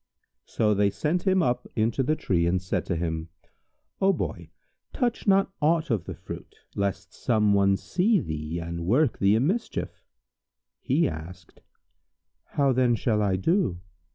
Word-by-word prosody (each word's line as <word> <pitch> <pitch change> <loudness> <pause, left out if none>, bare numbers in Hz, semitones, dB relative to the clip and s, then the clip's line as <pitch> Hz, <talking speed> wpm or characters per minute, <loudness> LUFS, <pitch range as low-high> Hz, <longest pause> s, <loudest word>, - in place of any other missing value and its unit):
So 105 -2 +1
they 100 0 +3
sent 170 - -1
him 190 -2 +4
up 125 -3 -1
into 115 +3 +1
the 155 +4 +1
tree 90 - 0
and 90 +2 +1
said 90 +1 -3
to 85 - 0
him, 80 -1 -3 0.7
"O 195 0 +5
Boy, - - -4 0.4
touch 240 -5 -1
not 195 0 +4
aught 160 0 +2
of 105 -7 0
the - - -6
fruit, - - -9 0.2
lest 100 -2 -3
some 105 -3 +2
one 100 -1 +3
see 195 - +1
thee 80 - -4
and 85 0 -5
work 130 +5 +2
thee 100 +1 +4
a - - +3
mischief." 190 - -2 0.8
He 155 +5 +1
asked, 85 +1 -9 0.8
"How 140 -2 +1
then 125 -2 +3
shall 110 -2 0
I 100 -2 +2
do?" 95 - +1
110 Hz, 155 wpm, -26 LUFS, -, 0.8 s, O